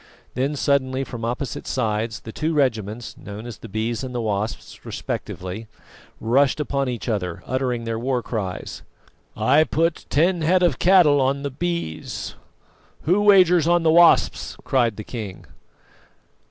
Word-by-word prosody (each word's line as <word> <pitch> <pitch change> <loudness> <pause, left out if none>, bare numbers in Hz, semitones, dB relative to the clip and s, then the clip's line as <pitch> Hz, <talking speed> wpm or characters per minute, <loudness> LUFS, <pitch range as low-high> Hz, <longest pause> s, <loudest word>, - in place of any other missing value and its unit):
Then 135 +4 -1
suddenly, 135 -1 +1
from 120 -3 -7
opposite 125 +3 -3
sides, 110 0 -1
the 110 - -8
two 155 +6 -2
regiments, 115 -5 -1
known 105 +2 -8
as 120 -4 -8
the - - -10
Bees 110 +4 -2
and 125 -1 -6
the 120 - -1
Wasps 105 0 -3
respectively, 95 +5 -5 0.5
rushed 135 +6 +2
upon 140 -2 -1
each 120 -1 -5
other, 90 -7 -2
uttering 130 -2 -1
their 115 -1 -3
war 125 0 -1
cries. 95 -6 -4 0.6
"I 145 +4 +4
put 160 +2 -1
ten 170 +4 +2
head 180 +3 +3
of 165 -7 +2
cattle 170 -6 +5
on 135 +2 0
the 140 - -3
Bees; 170 - -4 0.7
who 180 +6 +3
wagers 180 -5 +5
on 175 0 +3
the 160 - +4
Wasps?" 170 +1 +4
cried 120 -5 +1
the 105 - -5
king. 105 -5 -7
130 Hz, 150 wpm, -23 LUFS, 110-155 Hz, 0.7 s, cattle